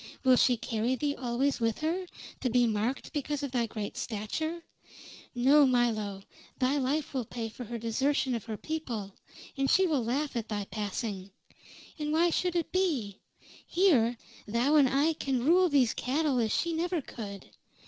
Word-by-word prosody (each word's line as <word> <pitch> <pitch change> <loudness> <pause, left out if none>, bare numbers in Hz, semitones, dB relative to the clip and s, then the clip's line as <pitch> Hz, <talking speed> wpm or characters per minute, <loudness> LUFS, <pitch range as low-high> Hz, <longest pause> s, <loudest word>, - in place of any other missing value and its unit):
Will 260 -2 +6
she 245 0 +4
carry 230 +3 -1
thee 285 +2 -1
always 260 +2 0
with 225 -2 0
her, 350 +4 -1 0.3
to 255 - 0
be 245 +1 +4
marked 225 +7 -2
because 295 -1 -2
of 280 - -3
thy 240 -2 0
great 210 -2 -5
stature? 315 +11 -3 0.7
No, 275 +5 +6
Milo, 215 -6 0 0.3
thy 265 +3 +1
life 280 +3 -1
will 260 -2 -1
pay 225 0 -5
for 245 +3 -8
her 235 +2 -5
desertion 260 +4 0
of 230 -4 -3
her 220 -2 -5
people, 235 -11 -4 0.4
and 270 -1 0
she 380 - +5
will 295 -8 +1
laugh 275 +5 -1
at 230 -2 -3
thy 205 -2 -2
passing. 205 -2 -4 0.7
And 300 0 -2
why 335 +2 +3
should 360 +1 0
it 340 - -1
be? 285 - 0 0.5
Here, 265 - +3 0.3
thou 235 +7 +1
and 280 -4 +6
I 285 +5 +2
can 265 -5 -2
rule 360 +3 +5
these 265 -6 +3
cattle 275 0 0
as 220 -2 +1
she 340 -1 0
never 340 +2 0
could. 200 -6 -8
255 Hz, 170 wpm, -30 LUFS, 225-300 Hz, 0.7 s, Will